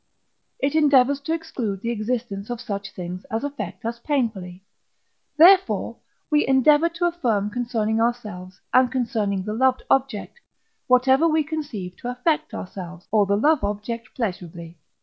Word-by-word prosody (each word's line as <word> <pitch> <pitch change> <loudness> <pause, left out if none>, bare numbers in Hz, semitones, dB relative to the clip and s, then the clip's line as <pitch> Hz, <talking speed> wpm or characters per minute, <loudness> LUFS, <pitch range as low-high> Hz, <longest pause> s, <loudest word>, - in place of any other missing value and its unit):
it 275 +1 -1
endeavours 285 -3 +4
to 285 +3 -5
exclude 255 - -3
the 235 - -1
existence 220 -2 -3
of 240 -1 -4
such 200 -4 -5
things 180 +1 -7
as 225 +3 -3
affect 225 -10 -6
us 235 +1 -3
painfully; 215 -10 -2 0.7
therefore, 375 +4 +5 0.4
we 300 0 +4
endeavour 295 +5 +4
to 335 +1 -2
affirm 235 - 0
concerning 225 -2 -1
ourselves, 210 -6 -3
and 255 -1 +5
concerning 220 -7 -1
the 210 - -4
loved 260 +2 +2
object, 270 - 0 0.5
whatever 260 +5 +4
we 315 -1 +2
conceive 285 - -5
to 245 - -5
affect 250 +6 -1
ourselves, 180 -1 -8
or 210 -2 +3
the 200 +1 +2
love 295 +3 +3
object 215 +3 -4
pleasurably. 175 -6 -5
235 Hz, 145 wpm, -23 LUFS, 200-280 Hz, 0.7 s, therefore